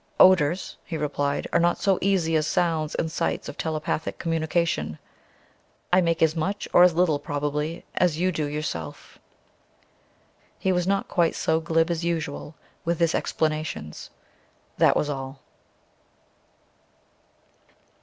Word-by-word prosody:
"Odours," 185 Hz, -1 st, +4 dB
he 165 Hz, -, -5 dB
replied, 145 Hz, -1 st, -1 dB
"are -, -, +4 dB
not 175 Hz, 0 st, +2 dB
so 195 Hz, -2 st, +2 dB
easy 180 Hz, -5 st, +2 dB
as 155 Hz, -1 st, +2 dB
sounds 160 Hz, -3 st, 0 dB
and 160 Hz, -, -1 dB
sights -, -, -2 dB
of -, -, -6 dB
telepathic 155 Hz, 0 st, -2 dB
communication. 165 Hz, -, -1 dB, 1.0 s
I 185 Hz, -, +6 dB
make 165 Hz, -1 st, +1 dB
as 160 Hz, 0 st, +3 dB
much, 195 Hz, +6 st, -2 dB
or -, -, +7 dB
as 180 Hz, -2 st, +6 dB
little, 165 Hz, -4 st, +2 dB
probably, 150 Hz, +3 st, -3 dB
as 175 Hz, -4 st, +2 dB
you 185 Hz, +2 st, +1 dB
do 155 Hz, -3 st, -2 dB
yourself." 145 Hz, -, -5 dB, 1.4 s
He 190 Hz, -, 0 dB
was 180 Hz, -1 st, 0 dB
not 195 Hz, 0 st, +1 dB
quite 170 Hz, -2 st, +1 dB
so 160 Hz, 0 st, +1 dB
glib 165 Hz, +1 st, +1 dB
as 170 Hz, 0 st, -2 dB
usual 160 Hz, -3 st, -3 dB, 0.3 s
with 170 Hz, 0 st, -1 dB
his 170 Hz, -1 st, +3 dB
explanations. 155 Hz, -, -2 dB, 0.7 s
That -, -, +5 dB
was 150 Hz, -, 0 dB
all. 135 Hz, -1 st, -5 dB
160 Hz, 135 wpm, -25 LUFS, 150-175 Hz, 1.4 s, or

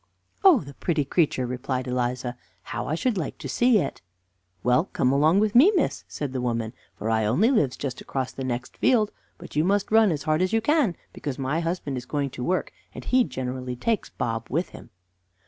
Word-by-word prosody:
"Oh, 375 Hz, -8 st, +7 dB
the 140 Hz, -2 st, -10 dB
pretty 155 Hz, -1 st, -1 dB
creature," 140 Hz, -3 st, +1 dB
replied 125 Hz, +1 st, -3 dB
Eliza, 125 Hz, 0 st, -2 dB, 0.3 s
"how -, -, -4 dB
I 155 Hz, -, 0 dB
should 215 Hz, +3 st, 0 dB
like 155 Hz, -, -4 dB
to -, -, -7 dB
see 245 Hz, -2 st, +3 dB
it!" 145 Hz, -9 st, -2 dB, 0.6 s
"Well, 125 Hz, +7 st, +3 dB
come 130 Hz, -8 st, 0 dB
along 155 Hz, +7 st, +4 dB
with 215 Hz, -1 st, +1 dB
me, 290 Hz, -, +7 dB
miss," 330 Hz, -, 0 dB
said 145 Hz, -3 st, -5 dB
the 130 Hz, -, -2 dB
woman, 115 Hz, -2 st, -2 dB, 0.2 s
"for 110 Hz, +2 st, -2 dB
I 110 Hz, -1 st, +2 dB
only 200 Hz, -, +3 dB
lives 150 Hz, -, +2 dB
just 130 Hz, -3 st, -4 dB
across 130 Hz, -1 st, -3 dB
the 135 Hz, -, -6 dB
next 125 Hz, -1 st, -4 dB
field, 220 Hz, -5 st, +3 dB, 0.3 s
but -, -, -11 dB
you 150 Hz, -, +3 dB
must 200 Hz, +3 st, +1 dB
run 220 Hz, -3 st, +5 dB
as 150 Hz, -3 st, -2 dB
hard 155 Hz, +2 st, +1 dB
as 185 Hz, +3 st, +1 dB
you 225 Hz, -, +4 dB
can, 265 Hz, -, +2 dB, 0.2 s
because 140 Hz, -3 st, -5 dB
my 140 Hz, +4 st, -1 dB
husband 165 Hz, -5 st, -2 dB
is 125 Hz, 0 st, -7 dB
going 140 Hz, -2 st, -1 dB
to 125 Hz, -, -6 dB
work, 185 Hz, +7 st, 0 dB, 0.2 s
and -, -, -8 dB
he 255 Hz, 0 st, +4 dB
generally 130 Hz, -, -4 dB
takes 220 Hz, -, -1 dB
Bob 115 Hz, -1 st, -3 dB
with 165 Hz, +7 st, -1 dB
him." -, -, -12 dB
145 Hz, 210 wpm, -25 LUFS, 125-195 Hz, 0.6 s, Oh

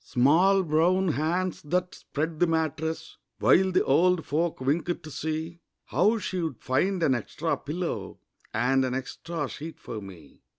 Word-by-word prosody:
Small 170 Hz, +10 st, +4 dB
brown 175 Hz, +4 st, +2 dB
hands 170 Hz, +4 st, -1 dB
that 180 Hz, +4 st, -1 dB
spread 155 Hz, +2 st, -4 dB
the 175 Hz, -, +4 dB
mattress 160 Hz, 0 st, -2 dB, 0.2 s
While 190 Hz, +1 st, +4 dB
the 185 Hz, -, +3 dB
old 175 Hz, +4 st, +3 dB
folk 165 Hz, +3 st, -1 dB
winked 155 Hz, +6 st, -1 dB
to 155 Hz, -, -9 dB
see 160 Hz, +3 st, -4 dB, 0.3 s
How 215 Hz, +5 st, +2 dB
she'd 170 Hz, -, -3 dB
find 175 Hz, +8 st, 0 dB
an 140 Hz, -, +4 dB
extra 145 Hz, +7 st, -2 dB
pillow 170 Hz, +4 st, -4 dB, 0.3 s
And 130 Hz, +4 st, +2 dB
an 130 Hz, -1 st, -1 dB
extra 145 Hz, +4 st, -4 dB
sheet 160 Hz, +5 st, -8 dB
for 110 Hz, -2 st, -6 dB
me. 95 Hz, -5 st, -13 dB
160 Hz, 145 wpm, -27 LUFS, 140-180 Hz, 0.3 s, Small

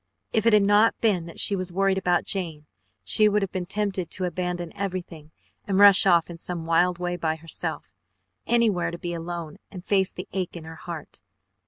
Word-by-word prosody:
If 220 Hz, 0 st, +2 dB
it 230 Hz, -, +5 dB
had 210 Hz, -1 st, +6 dB
not 205 Hz, +3 st, +3 dB
been 195 Hz, -7 st, +1 dB
that 170 Hz, -, -9 dB
she 200 Hz, -, +4 dB
was 185 Hz, -1 st, -3 dB
worried 195 Hz, +1 st, +1 dB
about 180 Hz, -2 st, +1 dB
Jane, 165 Hz, -6 st, -2 dB, 0.4 s
she 215 Hz, -1 st, +5 dB
would 210 Hz, 0 st, +1 dB
have 195 Hz, -, -4 dB
been 180 Hz, -2 st, -4 dB
tempted 195 Hz, -3 st, -2 dB
to 185 Hz, -, -3 dB
abandon 180 Hz, -1 st, -4 dB
everything 180 Hz, -5 st, -5 dB, 0.4 s
and 195 Hz, -2 st, 0 dB
rush 200 Hz, -1 st, +7 dB
off 170 Hz, -3 st, +4 dB
in 170 Hz, -1 st, -10 dB
some 170 Hz, -1 st, -5 dB
wild 175 Hz, +2 st, +2 dB
way 175 Hz, 0 st, -3 dB
by 160 Hz, -2 st, -1 dB
herself, 160 Hz, +1 st, -5 dB, 0.6 s
anywhere 225 Hz, -6 st, +2 dB
to 170 Hz, -, -6 dB
be 175 Hz, 0 st, -5 dB
alone 170 Hz, -2 st, -6 dB
and 185 Hz, -2 st, -10 dB
face 190 Hz, -2 st, +1 dB
the 180 Hz, -, -8 dB
ache 185 Hz, -2 st, -3 dB
in 165 Hz, -, -9 dB
her 160 Hz, +1 st, -9 dB
heart. 160 Hz, -1 st, -9 dB
180 Hz, 200 wpm, -25 LUFS, 170-195 Hz, 0.6 s, rush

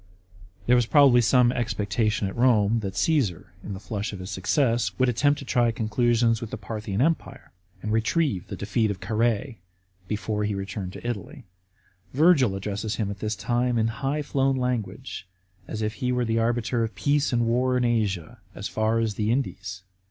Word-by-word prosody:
* 90 Hz, 0 st, -24 dB
There 125 Hz, -, +5 dB
was 120 Hz, -2 st, +2 dB
probably 135 Hz, -3 st, +6 dB
some 125 Hz, 0 st, +4 dB
expecta 110 Hz, -3 st, 0 dB
tion 105 Hz, -2 st, -1 dB
at 95 Hz, -, -6 dB
Rome 115 Hz, -3 st, +3 dB
that 95 Hz, -3 st, -5 dB
Csesar, 105 Hz, -, 0 dB
in 100 Hz, -, -5 dB
the -, -, -7 dB
flush 105 Hz, +1 st, -4 dB
of -, -, -5 dB
his 95 Hz, +2 st, -7 dB
success, 115 Hz, 0 st, +1 dB
would 130 Hz, -, +3 dB
attempt 145 Hz, +5 st, +2 dB
to -, -, -8 dB
try 120 Hz, -1 st, +2 dB
conclusions 115 Hz, +1 st, +1 dB
with 115 Hz, -, -5 dB
the -, -, -5 dB
Parthian 105 Hz, 0 st, -4 dB
Empire, 165 Hz, +2 st, -2 dB, 0.3 s
and 105 Hz, -, -2 dB
retrieve 110 Hz, -, 0 dB
the -, -, -5 dB
defeat 110 Hz, +2 st, 0 dB
of 100 Hz, -3 st, -4 dB
Carrh.ie, 110 Hz, +2 st, -1 dB, 0.5 s
before 105 Hz, 0 st, -2 dB
he 105 Hz, -1 st, -1 dB
returned 95 Hz, -1 st, -5 dB
to -, -, -7 dB
Italy. 125 Hz, +4 st, -5 dB, 0.7 s
Virgil 140 Hz, -, +4 dB
addresses 105 Hz, +3 st, -3 dB
him 105 Hz, -3 st, -2 dB
at 100 Hz, -, -8 dB
this 105 Hz, +1 st, -2 dB
time 120 Hz, +3 st, 0 dB
in 110 Hz, 0 st, +2 dB
high 145 Hz, +2 st, -1 dB
flown 135 Hz, -1 st, +1 dB
language, 125 Hz, -3 st, -3 dB, 0.4 s
as 110 Hz, 0 st, -4 dB
if 105 Hz, 0 st, -1 dB
he 125 Hz, +1 st, -2 dB
were 125 Hz, -1 st, 0 dB
the 115 Hz, 0 st, +1 dB
arbiter 120 Hz, +1 st, 0 dB
of 115 Hz, -, -4 dB
peace 145 Hz, 0 st, +1 dB
and 120 Hz, -1 st, +2 dB
war 125 Hz, +2 st, +2 dB
in 125 Hz, -, +1 dB
Asia,f 105 Hz, -8 st, -1 dB, 0.2 s
as 100 Hz, -, -4 dB
far 110 Hz, +4 st, 0 dB
as 115 Hz, -2 st, 0 dB
the 105 Hz, +1 st, -1 dB
Indies. 100 Hz, -7 st, -3 dB
115 Hz, 190 wpm, -25 LUFS, 105-125 Hz, 0.7 s, probably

